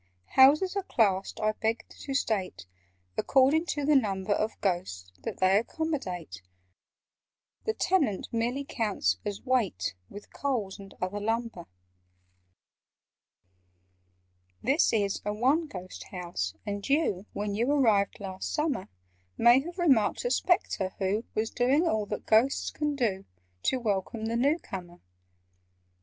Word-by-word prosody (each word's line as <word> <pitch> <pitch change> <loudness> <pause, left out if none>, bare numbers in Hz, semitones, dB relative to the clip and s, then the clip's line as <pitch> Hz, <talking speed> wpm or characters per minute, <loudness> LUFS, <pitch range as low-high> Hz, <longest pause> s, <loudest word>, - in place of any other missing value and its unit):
"Houses 300 +9 +6
are 395 - +1
classed, 200 - +1
I 215 0 +2
beg 220 +2 -2
to 275 - -7
state, 190 - -1 0.5
According 280 +5 +3
to 290 -4 -1
the 300 0 +4
number 200 -6 +1
Of 215 +2 -2
Ghosts 95 - -2
that - - -5
they 190 +2 +4
accommodate: 215 - -4 1.2
(The 440 - 0
Tenant 300 - +1
merely 240 +4 -1
counts 205 - 0
as 205 -1 -5
weight, 195 - 0 0.2
With 205 - -11
Coals 225 -8 -2
and 195 -1 -12
other 185 +3 -2
lumber). 225 -4 -2 3.0
"This 275 +6 +3
is 205 -3 0
a 210 - -2
'one 270 +9 +2
ghost' 185 -7 -8
house, 170 - -4
and 205 -1 -4
you 275 - +1
When 205 0 -2
you 235 +6 +1
arrived 220 -9 +3
last 190 -2 -5
summer, 300 -10 -1 0.5
May 240 +2 +7
have 345 +6 -7
remarked 285 - +3
a - - +1
Spectre 205 - +1
who 200 +4 -1
Was 220 +1 0
doing 275 +8 +2
all 215 -7 0
that 210 - -5
Ghosts 230 +5 +3
can 295 -1 -2
do 210 -8 -1 0.4
To 260 - +1
welcome 220 0 -2
the 230 +1 -1
new 280 +7 +3
comer. 175 - -8
220 Hz, 135 wpm, -28 LUFS, 195-275 Hz, 3.0 s, May